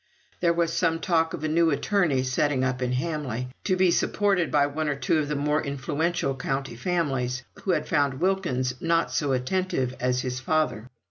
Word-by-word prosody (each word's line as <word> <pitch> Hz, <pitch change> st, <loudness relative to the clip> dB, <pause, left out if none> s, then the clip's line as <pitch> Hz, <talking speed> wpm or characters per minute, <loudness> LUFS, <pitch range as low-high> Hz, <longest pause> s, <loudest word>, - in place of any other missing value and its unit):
There 170 Hz, -, +3 dB
was 170 Hz, -1 st, 0 dB
some 165 Hz, -1 st, +1 dB
talk 165 Hz, -2 st, +1 dB
of 155 Hz, -, -9 dB
a -, -, +1 dB
new 165 Hz, +1 st, +3 dB
attorney 160 Hz, -3 st, +1 dB
setting 130 Hz, +1 st, +1 dB
up 130 Hz, 0 st, -1 dB
in 125 Hz, 0 st, 0 dB
Hamley, 130 Hz, -3 st, -2 dB, 0.2 s
to 185 Hz, -, +2 dB
be 185 Hz, -1 st, +4 dB
supported 195 Hz, -3 st, +1 dB
by 145 Hz, -1 st, +3 dB
one 150 Hz, +1 st, -2 dB
or 145 Hz, -, 0 dB
two 140 Hz, +4 st, +1 dB
of 150 Hz, -, -1 dB
the 150 Hz, -, -2 dB
more 150 Hz, +2 st, +1 dB
influential 145 Hz, +2 st, -1 dB
county 135 Hz, -2 st, -3 dB
families, 130 Hz, -5 st, -1 dB, 0.2 s
who -, -, -3 dB
had -, -, -1 dB
found 145 Hz, -4 st, +1 dB
Wilkins 170 Hz, -9 st, 0 dB
not 165 Hz, 0 st, +1 dB
so 145 Hz, -2 st, 0 dB
attentive 130 Hz, 0 st, 0 dB
as 125 Hz, 0 st, +1 dB
his 130 Hz, 0 st, -3 dB
father. 140 Hz, -5 st, 0 dB
145 Hz, 190 wpm, -26 LUFS, 130-170 Hz, 0.2 s, be